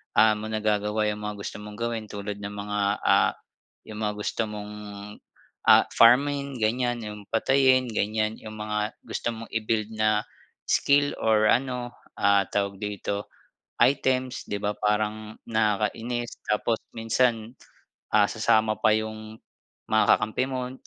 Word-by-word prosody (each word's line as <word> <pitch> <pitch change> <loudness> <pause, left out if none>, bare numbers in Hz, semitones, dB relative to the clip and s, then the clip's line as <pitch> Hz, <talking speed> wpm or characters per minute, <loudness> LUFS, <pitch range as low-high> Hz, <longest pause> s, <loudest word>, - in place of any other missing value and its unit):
ah, 110 +1 +6
mo 110 - -6
nagagawa 105 0 0
yung 105 - -6
mga 105 0 -4
gusto 100 - -6
mong 105 0 -9
gawin 115 -2 -2
tulad 100 0 -6
ng 105 0 -6
mga, 105 0 -3 0.2
ah, - - +4 0.6
yung 105 - -7
mga 105 - -1
gusto 115 - -2
mong, 105 0 -7 0.9
ah, - - +7
farming, 140 +2 +4
ganyan, 120 +2 0
yung 105 -1 -8
patayin, 130 +1 +3
ganyan, 110 0 -1
yung 110 -1 -10
mga 105 +1 -2
gusto 120 - -3
mong 115 0 -9
i-build 110 -1 -1
na 110 -1 +2 0.5
skill 145 0 +3
or 110 -1 +3
ano, 125 0 0 0.3
ah, 100 -1 +4
tawag 100 -1 -1
dito, 100 0 -4 0.6
items. 130 0 +2
'Di 100 0 -4
ba 105 0 -2
parang 105 +1 -1
nakakainis? 110 +2 -1
Tapos 110 +2 0 0.2
minsan, 115 0 0 0.6
ah, 105 -1 +5
sasama 110 -1 +2
pa 110 - +4
yung 110 0 -6 0.5
mga 110 0 +4
kakampi 110 +4 -1
mo, 125 -1 -3
110 Hz, 140 wpm, -26 LUFS, 105-120 Hz, 0.9 s, ah